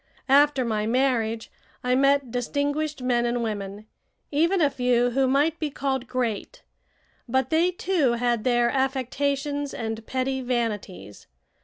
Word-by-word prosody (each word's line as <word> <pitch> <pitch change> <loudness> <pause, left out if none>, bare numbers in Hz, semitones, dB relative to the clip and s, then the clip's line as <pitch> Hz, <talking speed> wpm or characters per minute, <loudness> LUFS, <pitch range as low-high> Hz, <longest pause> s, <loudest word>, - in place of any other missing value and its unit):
After 280 -1 +4
my 215 -2 -1
marriage 230 -3 0 0.3
I 250 0 +1
met 275 -1 +3
distinguished 285 +3 -2
men 245 -1 +2
and 240 0 0
women, 205 -1 -5 0.5
even 335 +6 +2
a 295 -4 +3
few 245 -1 +2
who 265 +2 +2
might 290 +5 +2
be 310 - -1
called 265 -3 -2
great; 250 - -3 0.7
but 260 +1 0
they, 330 +3 +3
too, 350 -8 +1
had 235 -2 0
their 240 -1 +2
affectations 280 +2 -1
and 225 -1 -4
petty 265 0 -1
vanities. 210 - -4
255 Hz, 135 wpm, -25 LUFS, 235-285 Hz, 0.7 s, After